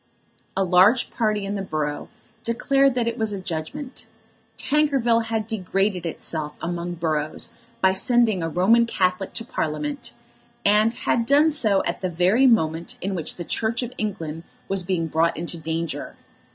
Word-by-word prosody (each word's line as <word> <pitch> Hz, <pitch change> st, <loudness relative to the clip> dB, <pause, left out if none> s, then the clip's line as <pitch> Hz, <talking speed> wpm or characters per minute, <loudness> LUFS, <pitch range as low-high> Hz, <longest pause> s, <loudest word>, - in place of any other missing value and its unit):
A 195 Hz, -, +3 dB
large 190 Hz, +7 st, +4 dB
party 215 Hz, -3 st, 0 dB
in 200 Hz, -, -3 dB
the 200 Hz, -, -2 dB
borough 150 Hz, -5 st, -3 dB, 0.3 s
declared 275 Hz, +3 st, +2 dB
that 240 Hz, -2 st, 0 dB
it 235 Hz, +1 st, -2 dB
was 220 Hz, -1 st, +1 dB
a 200 Hz, -, -4 dB
judgment. 185 Hz, -, -6 dB, 0.5 s
Tankerville 270 Hz, -6 st, +2 dB
had 225 Hz, -1 st, -2 dB
degraded 195 Hz, -4 st, -1 dB
itself 155 Hz, -2 st, -4 dB
among 175 Hz, 0 st, -3 dB
boroughs 155 Hz, -2 st, -2 dB, 0.3 s
by 190 Hz, -, +5 dB
sending 225 Hz, -2 st, +3 dB
a 165 Hz, -, -1 dB
Roman 225 Hz, +8 st, +4 dB
Catholic 185 Hz, -2 st, 0 dB
to 230 Hz, -, -4 dB
Parliament, 280 Hz, -, -3 dB, 0.5 s
and 210 Hz, +2 st, +5 dB
had 230 Hz, 0 st, -1 dB
done 295 Hz, +3 st, +5 dB
so 215 Hz, -10 st, +1 dB
at -, -, -2 dB
the 185 Hz, -, -1 dB
very 185 Hz, +10 st, +3 dB
moment 165 Hz, -8 st, +1 dB
in 195 Hz, +2 st, -3 dB
which 170 Hz, -4 st, -1 dB
the 175 Hz, -, -6 dB
Church 230 Hz, +6 st, -1 dB
of 245 Hz, +1 st, -6 dB
England 165 Hz, -7 st, -3 dB, 0.3 s
was 195 Hz, -1 st, +1 dB
being 175 Hz, -2 st, -1 dB
brought 165 Hz, +1 st, +1 dB
into 170 Hz, +1 st, -2 dB
danger. 165 Hz, 0 st, -4 dB
195 Hz, 160 wpm, -23 LUFS, 170-230 Hz, 0.5 s, by